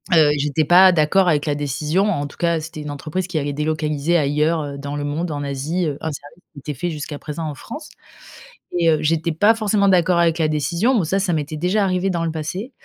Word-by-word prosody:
Heu, 155 -2 +6
j'étais 150 +2 0
pas 185 +4 +7
d'accord 175 +3 +3
avec 150 -3 +2
la 150 - 0
décision, 145 +6 -1
en 145 -8 -1
tout 145 - -11
cas, 170 -2 +1
c'était 155 -1 -8
une 150 - -6
entreprise 155 +6 -4
qui 175 -3 -3
allait 145 -1 -2
délocaliser 150 +2 0
ailleurs, 150 +2 +1
heu, 140 -1 -6
dans 145 +1 -5
le 145 - -3
monde, 155 +4 -2
en 145 -2 -4
Asie, 145 +6 -2
heu, 145 -2 -3
un 160 - -2
service 145 +4 -11
qui 145 - -10
était 150 +2 -5
fait 175 +7 -3
jusqu'à 150 -2 -6
présent 155 +1 -5
en 150 - -4
France. 295 - -9 0.9
Et, 165 -1 +3
heu, 155 - +2
j'étais 165 +2 0
pas 205 +8 +4
forcément 210 -2 +1
d'accord 180 -2 +3
avec 170 -1 +2
la 160 -2 +2
décision. 170 - 0
Bon 205 - +2
ça, 170 +5 0
ça 190 -3 0
m'était 155 0 -3
déjà 185 +6 +1
arrivé 185 0 0
dans 170 -1 -1
le 165 - -1
passé, 170 - -5
160 Hz, 240 wpm, -20 LUFS, 145-175 Hz, 0.9 s, pas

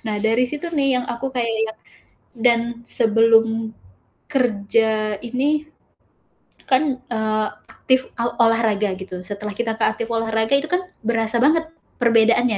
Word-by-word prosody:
Nah 215 -2 -3
dari 230 +3 +2
situ 305 +5 -5
nih, 275 -4 +2
yang 250 - -1
aku 235 +3 -4
kayak 240 -3 -2 0.2
yang 220 - -9 0.6
dan 235 -1 +3 0.3
sebelum 225 -1 +3 0.5
kerja 220 -4 +1
ini 285 +6 0 1.0
kan, 265 0 +2
eee, 220 -3 -2 0.2
aktif, 260 0 0
aw 235 0 -3
olahraga 220 -4 +2
gitu, 185 -1 -8
setelah 205 +3 -6
kita 225 +2 -2
ke 225 - -3
aktif 225 +1 0
olahraga, 225 +1 0
itu 285 +4 -1
kan 360 +1 0 0.2
berasa 230 +1 +1
banget 320 +3 +3 0.3
perbedaannya, 235 -1 +3
230 Hz, 135 wpm, -21 LUFS, 220-255 Hz, 1.0 s, dan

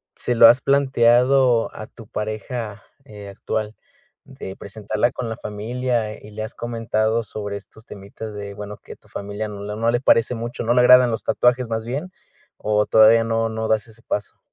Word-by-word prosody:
¿se 125 - -2
lo 115 -1 +8
has 120 +3 +5
planteado 130 -2 +3
a 110 - -7
tu 115 -3 -15
pareja, 110 0 -5 0.2
eh, 105 -6 -11
actual? 105 +2 -4 0.5
De 95 - -9
presentarla 105 +3 -2
con 125 - -5
la 110 - -4
familia, 110 +2 -3
y, 105 - -12
¿le 110 +1 -5
has 110 - -8
comentado 115 -1 -1
sobre 105 -1 -5
estos 110 +2 -15
temitas? 105 +2 -9
De 100 -1 -7
bueno, 105 0 -8
que - - -12
tu - - -26
familia 105 +2 -5
no 105 +3 -2
le 120 - +1
parece 120 -1 +3
mucho, 120 +1 -5
no 120 +1 +2
le 125 - +3
agradan 125 0 +7
los 110 - -3
tatuajes 125 0 +2
más 110 0 -3
bien, 140 +9 -4 0.5
¿o 105 0 0
todavía 110 +1 +5
no 115 0 0
no 110 0 -3
das 110 -1 +1
ese 110 +1 -16
paso? 105 -2 -4
110 Hz, 180 wpm, -21 LUFS, 105-120 Hz, 0.5 s, lo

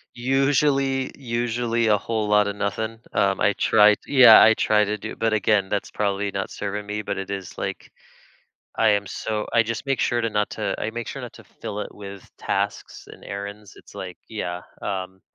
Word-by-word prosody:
Usually, 135 +1 +1
usually 120 -2 -1
a 105 - +4
whole 110 0 -2
lotta 105 -1 +3
nothing. 110 +2 -3
Um, 95 -1 +2
I 105 - +4
tried 105 -1 +5
yeah, 130 -5 +9
I 110 - +7
tried 105 -1 +3
to 105 +1 -2
do - - -7
but, 115 -1 +1
again, 105 -2 +2
that's 100 -1 -2
probably 100 -1 -1
not 95 0 -3
serving 105 0 -5
me, 105 +1 -3
but 100 - -3
it 95 0 -5
is 95 -3 -6
like - - -5 0.9
I - - +3
am 100 -1 +1
so 105 +1 -3
I 115 - +6
just 115 +4 -5
make 135 -1 0
sure 120 -1 +1
to 115 - 0
not 105 -1 -1
to 105 -2 -2
I 105 - -2
make 120 +1 -5
sure - - -6
not - - -8
to - - -14
fill 105 - -7
it - - -7
with 100 -2 -10
tasks - - -3
and - - -14
errands. 100 +1 -7
It's, - - -17
like 95 -3 -7
yeah. 90 -5 -4 0.2
Um, 95 -1 -4
105 Hz, 195 wpm, -23 LUFS, 100-115 Hz, 0.9 s, yeah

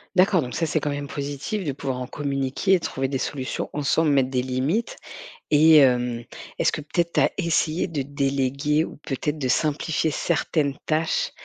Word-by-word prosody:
D'accord, 185 -1 +4
donc 125 -1 -5
ça, 165 - 0
c'est 155 0 0
quand 145 0 -2
même 145 0 -4
positif, 145 +8 -4
de 140 - -1
pouvoir 130 -2 -4
en 125 - -5
communiquer 140 +6 -1
et 185 - +5
de - - -6
trouver 135 0 -2
des 135 - -1
solutions 130 0 -3
ensemble, 150 +2 +2
mettre 135 -2 +3
des 125 -1 0
limites, 135 - -1 0.6
et, 155 +2 +7
hem, 125 -4 +3 0.3
est-ce - - +2
que, - - -3
peut-être, 170 +3 -1
tu - - +2
as - - +3
essayé 170 -1 +1
de 155 -5 -3
déléguer 140 +2 0
ou - - -9
peut-être 150 +1 -3
de 135 - -2
simplifier 155 +3 0
certaines 150 -3 0
tâches 155 +1 0
145 Hz, 190 wpm, -24 LUFS, 135-160 Hz, 0.6 s, et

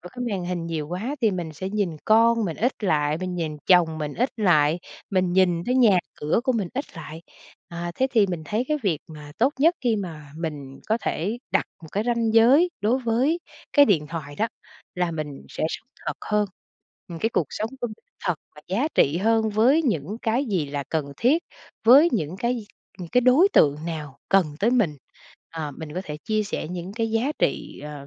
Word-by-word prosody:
ở 180 - -10
cái 245 -1 -4
màn 185 -3 -2
hình 175 -2 -3
nhiều 160 -3 -3
quá 215 - -3
thì 220 -3 +3
mình 175 -4 -4
sẽ 190 +5 -5
nhìn 200 -7 -1
con 230 +1 +4
mình 165 -4 -3
ít 245 +4 +1
lại, 150 -3 +1
mình 185 -1 -4
nhìn 160 -3 -3
chồng 165 -3 +4
mình 150 -1 -4
ít 250 +3 0
lại, 170 -6 +3 0.3
mình 185 -2 +1
nhìn 180 -2 +3
thấy 250 - 0
nhà 220 -8 +5 0.2
cửa 150 +9 0
của 260 - +2
mình 210 -7 -1
ít 275 - -1
lại. 160 +1 -8 0.5
À, 170 0 -5
thế 265 - +2
thì 220 -4 +4
mình 175 -4 -4
thấy 215 +9 -1
cái 305 - +2
việc 170 -7 +1
mà 150 -2 -10
tốt 275 - +3
nhất 330 +4 +5
khi 235 -4 +1
mà 155 -7 -7
mình 145 -5 -6
có 220 +2 +2
thể 205 +9 -2
đặt - - +3 0.2
một 160 - -10
cái 205 +2 0
ranh 230 -2 +1
giới 275 +10 +6
đối 230 +6 +2
với 255 +7 +1 0.3
cái 285 -1 +7
điện 160 - +2
thoại 150 -3 -6
đó, 225 +2 0 0.5
là 180 -1 0
mình 150 -4 -5
sẽ - - -3
sống - - -7 0.2
thật - - -2
hơn. 210 -1 +2 0.6
Ừm, 170 -1 -7
cái 225 - +1
cuộc - - +1
sống 220 +2 -3
của 240 - 0
mình 215 - -11 0.2
thật 180 -3 +1 0.2
và - - -11
giá 235 +11 +1
trị 150 +5 +3
hơn 220 +1 +2
với 245 +10 +4
những 200 - -1
cái 240 +5 +1
gì 185 - -1
là 140 0 -4
cần 145 -3 -2
thiết, 295 +8 +3 0.4
với 280 +8 +8
những 175 -4 -1
cái 235 -1 -1 0.3
những 175 -2 -7
cái 250 - +4
đối 275 +11 +6
tượng 145 -1 +5
nào 150 -5 -6
cần 195 -4 +4
tới 225 +4 +3
mình. 200 - +2 0.5
Ờ, 155 -3 -5
mình 155 -2 -7
có 185 - -2
thể 150 -3 -5
chia 215 -1 +1
sẻ 200 - -4
những 180 +1 -6
cái 225 -1 -1
giá 235 +7 +1
trị, - - -1
ờ, 145 -2 -8
190 Hz, 215 wpm, -24 LUFS, 160-230 Hz, 0.6 s, với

